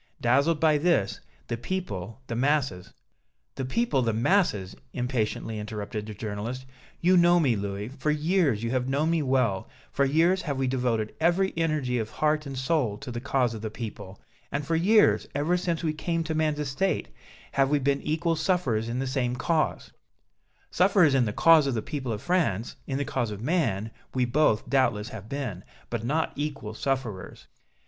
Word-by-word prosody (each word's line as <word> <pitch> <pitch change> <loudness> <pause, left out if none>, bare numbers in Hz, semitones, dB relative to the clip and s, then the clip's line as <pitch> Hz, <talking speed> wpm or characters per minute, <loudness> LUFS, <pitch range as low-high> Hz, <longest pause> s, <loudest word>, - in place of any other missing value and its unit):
Dazzled 140 +7 +3
by 155 -2 +4
this, 160 - +1 0.3
the - - -2
people, 115 - -4
the 115 - -4
masses 130 -8 0 0.3
" - - -50
"The 130 - -2
people, 145 - +1
the 115 -2 +1
masses!" 110 - +1 0.2
impatiently 115 -3 -2
interrupted 105 0 -5
the 105 - -7
journalist. 110 +5 -5 0.4
"You 180 +2 +4
know 175 0 +5
me, 135 -8 +3
Louis; 100 +1 -4
for 135 +2 -3
years 150 - +1
you 115 - -1
have 130 0 0
known 150 +4 +1
me 165 -1 +2
well, 130 -8 +1 0.2
for 140 - +1
years 165 +7 +3
have 140 -4 -3
we 135 - 0
devoted 125 -4 0
every 175 +4 +2
energy 155 -7 0
of 110 -1 -3
heart 155 +2 0
and 135 -1 -6
soul 130 -6 0
to 135 +1 -8
the 120 0 -4
cause 130 -3 +1
of 110 - -7
the 110 - -3
people, 105 -3 -8 0.3
and 140 0 -2
for 165 - 0
years, 205 +6 +4
ever 150 +5 +1
since 175 -2 -1
we 155 -2 0
came 165 +2 -2
to 160 0 -3
man's 155 -1 +1
estate, 150 +6 -1 0.4
have 135 -1 +2
we 150 - +3
been 140 0 +1
equal 165 +2 0
sufferers 150 - 0
in 120 - -2
the 135 - -1
same 130 -2 -1
cause 155 +4 -1 0.4
" - - -50 0.3
"Sufferers 180 -5 +4
in 130 -3 +3
the 105 - -1
cause 160 +5 +5
of 135 - 0
the 110 - -1
people 135 -6 -4
of 105 0 -4
France, 145 - 0
in 135 - -2
the 140 - -1
cause 120 -4 -1
of 105 -2 -6
man, 115 - 0 0.2
we 125 -1 +2
both, 120 -3 +2
doubtless, 120 -6 +1
have 110 0 -9
been, 125 -10 -4 0.3
but 120 -2 -2
not 155 +7 0
equal 140 -7 -4
sufferers. 120 -5 -3
135 Hz, 185 wpm, -27 LUFS, 115-155 Hz, 0.4 s, know